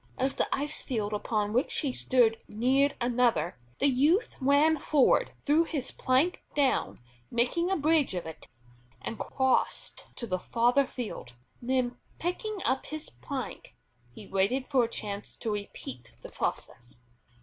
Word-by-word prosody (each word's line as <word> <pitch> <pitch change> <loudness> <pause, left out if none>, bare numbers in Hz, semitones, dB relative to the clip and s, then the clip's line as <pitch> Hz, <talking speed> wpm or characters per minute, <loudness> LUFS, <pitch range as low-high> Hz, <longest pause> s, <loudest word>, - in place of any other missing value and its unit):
As 265 +1 +1
the - - 0
ice 295 +2 -1
field 215 -5 -2
upon 210 0 -1
which 250 +3 +1
he 275 -4 -1
stood 235 -4 +3
neared 265 +6 +2
another, 240 - +1 0.2
the - - +1
youth 290 - +3
ran 285 +3 +4
forward, 280 -2 +3
threw 310 +3 +4
his 300 -6 -3
plank 270 +7 +1
down, 280 -3 +1 0.3
making 250 +10 +1
a 385 - +2
bridge 305 - +2
of 175 - -3
it, 160 0 -9 0.5
and 225 - -6
crossed 265 -1 0
to 235 - -3
the 185 -4 -1
farther 245 +7 +2
field. 215 - -6 0.3
Then 250 0 0 0.2
picking 385 +4 -3
up 265 - 0
his 310 0 -6
plank, 120 0 -6 0.4
he 200 - -10
waited 195 +8 +1
for 260 -4 +3
a - - -6
chance 205 -2 -4
to 225 - -3
repeat 130 - -6
the - - -8
process. 120 0 -4
255 Hz, 150 wpm, -29 LUFS, 215-285 Hz, 0.5 s, ran